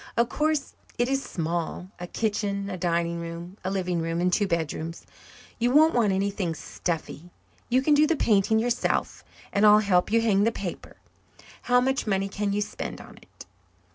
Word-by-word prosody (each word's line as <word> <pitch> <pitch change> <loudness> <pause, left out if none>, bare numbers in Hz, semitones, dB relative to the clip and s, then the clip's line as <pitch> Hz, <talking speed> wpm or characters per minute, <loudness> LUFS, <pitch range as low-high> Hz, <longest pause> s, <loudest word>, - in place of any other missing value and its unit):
Of 235 +1 +3
course 305 0 0 0.2
it 240 - +1
is 270 +1 0
small 170 - -4
a 175 - -6
kitchen, 200 -1 -2
a - - -3
dining 170 -1 0
room, 170 +3 -7
a 185 - -1
living 180 -3 -1
room, 165 +1 -2
and 180 +1 +1
two 205 +1 +2
bedrooms. 165 -1 -3 0.5
You 240 +1 +2
won't 310 +5 +5
want 225 -4 +3
anything 195 -3 -1
stuffy. 170 0 -5 0.4
You 255 +2 +3
can 300 - +4
do 300 +1 +5
the 330 - +2
painting 215 -4 +2
yourself, 235 +2 -1 0.3
and 200 - +2
I'll 210 0 +8
help 200 -3 +2
you 230 - +4
hang 210 -3 +3
the 230 - +3
paper. 195 -6 -7 0.7
How 245 0 +6
much 265 -1 0
money 195 -1 0
can 205 0 -2
you 205 +1 0
spend 205 - -5
on - - -13
it?" - - -15
200 Hz, 180 wpm, -26 LUFS, 175-230 Hz, 0.7 s, I'll